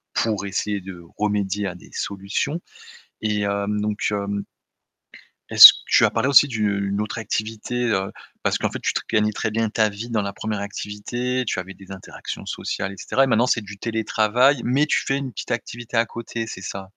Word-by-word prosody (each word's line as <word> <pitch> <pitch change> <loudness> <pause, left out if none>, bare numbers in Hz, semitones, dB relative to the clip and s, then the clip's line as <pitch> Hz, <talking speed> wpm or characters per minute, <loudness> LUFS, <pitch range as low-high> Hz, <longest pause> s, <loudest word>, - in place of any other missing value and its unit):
pour 105 -3 0
essayer 100 +1 -2
de 90 -2 -10 0.2
remédier 105 -1 0
à 90 - -5
des 90 - -15
solutions 100 - -3 0.6
et 105 -1 0
hem, 100 +1 -1
donc 105 0 -1
heu, 100 -1 -2 1.2
est-ce - - +12
que - - -9
tu - - +5
as - - 0
parlé 115 +2 0
aussi 140 +1 +7
d'une 100 -4 -1
autre 105 - -5
activité, 110 +1 -4 0.2
heu, 95 -2 0 0.3
parce - - +1
qu'en - - -1
fait - - -6
tu - - 0 0.2
gagnais 105 -1 +2
très 110 - -2
bien 115 +1 0
ta 110 0 +2
vie 105 +4 -7
dans 110 - +1
la 100 0 -4
1re 105 -2 -3
activité, 120 +5 -3
tu - - -1
avais 95 +1 -5
des 95 0 -16
interactions 95 - -8
sociales 95 - -3
et - - -15
cetera 135 - +2
et - - 0
maintenant 120 -1 +3
c'est 125 -2 +2
du 100 0 -10
télétravail 115 +4 +2
mais 135 +5 +2
tu - - +1
fais 135 - 0
une 135 -2 -5
petite - - -7
activité 120 0 -4
à 115 - +4
côté, 115 0 -5
c'est 95 -4 -8
ça? 95 0 -7
105 Hz, 200 wpm, -22 LUFS, 100-115 Hz, 1.2 s, est-ce